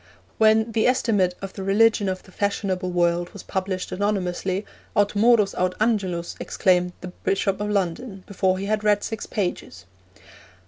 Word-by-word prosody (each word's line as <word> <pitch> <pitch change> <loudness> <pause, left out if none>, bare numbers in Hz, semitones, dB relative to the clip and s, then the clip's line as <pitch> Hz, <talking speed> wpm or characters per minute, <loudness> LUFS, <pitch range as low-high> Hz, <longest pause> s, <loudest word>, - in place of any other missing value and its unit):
When 220 +1 +4
The 220 -1 +2
Estimate 205 -8 +2
of 195 - -6
the - - -7
Religion 205 +1 +3
of 185 0 -4
the - - -17
Fashionable 190 -2 -1
World 175 0 +1
was - - -9
published 185 -1 -3
anonymously, 190 -1 -1 0.3
'Aut 205 0 +2
Morus, 215 -1 +4
aut 180 0 -1
Angelus,' 195 -6 0
exclaimed 180 -2 +1
the 185 - -6
Bishop 195 +2 -1
of 210 - -2
London, 195 +1 -2
before 190 -1 0
he 195 - -4
had 215 +1 -1
read 210 -1 +3
six 220 -2 -5
pages. 180 - -4
195 Hz, 155 wpm, -23 LUFS, 185-210 Hz, 0.3 s, When